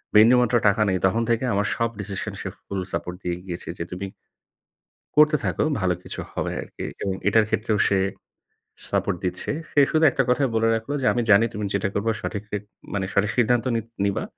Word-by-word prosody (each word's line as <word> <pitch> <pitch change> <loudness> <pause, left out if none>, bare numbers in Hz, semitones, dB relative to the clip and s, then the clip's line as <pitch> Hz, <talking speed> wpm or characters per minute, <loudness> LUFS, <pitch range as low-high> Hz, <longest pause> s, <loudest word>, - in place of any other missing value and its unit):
বিন্দু 110 +4 +8
মাত্র 120 0 +1
টাকা 105 +2 +3
নেই 95 - +2
তখন 110 +5 +2
থেকে 115 +1 +2
আমার 100 +1 +1
সব 115 0 0
decision 100 -1 -4
সে - - -5 0.2
full 100 -1 -3
support 90 +1 -3
দিয়ে 85 -1 -1
গিয়েছে, 90 -2 -6
যে - - -3
তুমি 90 +2 -4 1.1
করতে 150 0 +7
থাকো - - 0 0.2
ভালো 90 -1 +2
কিছু - - -7
হবে - - -2
আরকি - - -9 0.2
এবং 95 -1 -1
এটার 110 +2 +4
ক্ষেত্রেও 110 -1 0
সে 100 - +2 0.9
support - - 0
দিচ্ছে। 90 0 -2 0.2
সে - - +3
শুধু 160 0 +2
১ - - -9
টা 135 - +4
কথাই 135 +2 +3
বলে 115 0 +3
রাখলো 115 +5 -3
যে, - - -1
"আমি 120 - +1
জানি 105 +3 +7
তুমি 105 0 -3
যেটা 100 0 +1
করবা 110 +3 0
সঠিক 100 -1 -4 0.5
মানে 100 -2 -1
সঠিক 100 +1 +2
সিদ্ধান্ত 120 0 +3
নিত 115 0 -2 0.2
নিবা। 100 -1 0
105 Hz, 195 wpm, -24 LUFS, 95-115 Hz, 1.1 s, বিন্দু